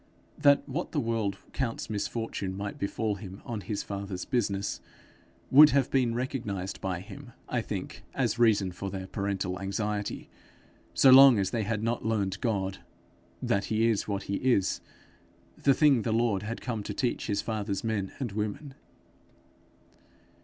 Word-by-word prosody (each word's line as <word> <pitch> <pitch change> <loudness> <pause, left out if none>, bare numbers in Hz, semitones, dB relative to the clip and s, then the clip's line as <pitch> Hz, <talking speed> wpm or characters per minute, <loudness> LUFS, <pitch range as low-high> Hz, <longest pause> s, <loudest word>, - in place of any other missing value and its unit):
That 145 -1 +4
what 155 +6 -4
the 150 - +1
world 115 -5 -1 0.2
counts 120 -4 -2
misfortune 105 -2 -3
might 100 0 -5
befall 105 +1 -1
him 95 -1 -10
on 115 -3 -4
his 100 +2 -3
father's 100 -2 -5
business, 100 -5 -1 0.7
would 150 +3 +10
have 140 -3 +2
been 125 -4 +2
recognized 110 -7 -3
by 90 -2 -2
him, 120 +5 -11
I 120 - -1
think, 100 -4 -5
as - - 0
reason 105 -5 +4
for 100 +2 -5
their 95 0 -5
parental 95 -2 -3
anxiety 105 +1 -3 0.7
so 135 - +7
long 135 -2 +9
as 95 -2 0
they 115 - 0
had 110 0 -2
not 115 +1 -1
learned 100 -3 -1
God 95 -5 -1 0.6
that 100 0 +1
he 110 +1 +1
is 110 -3 0
what 100 -2 -2
he 100 - -2
is 120 -7 +1 0.7
the 140 -2 +3
thing 140 -5 +5
the 110 - -1
Lord 115 -3 +1
had 115 +2 -5
come 115 -4 -3
to - - -5
teach 125 -2 -1
his 100 -2 0
father's 105 -3 -2
men 105 -4 -1
and 125 -6 -3
women. 105 +7 -4
105 Hz, 160 wpm, -29 LUFS, 100-120 Hz, 0.7 s, would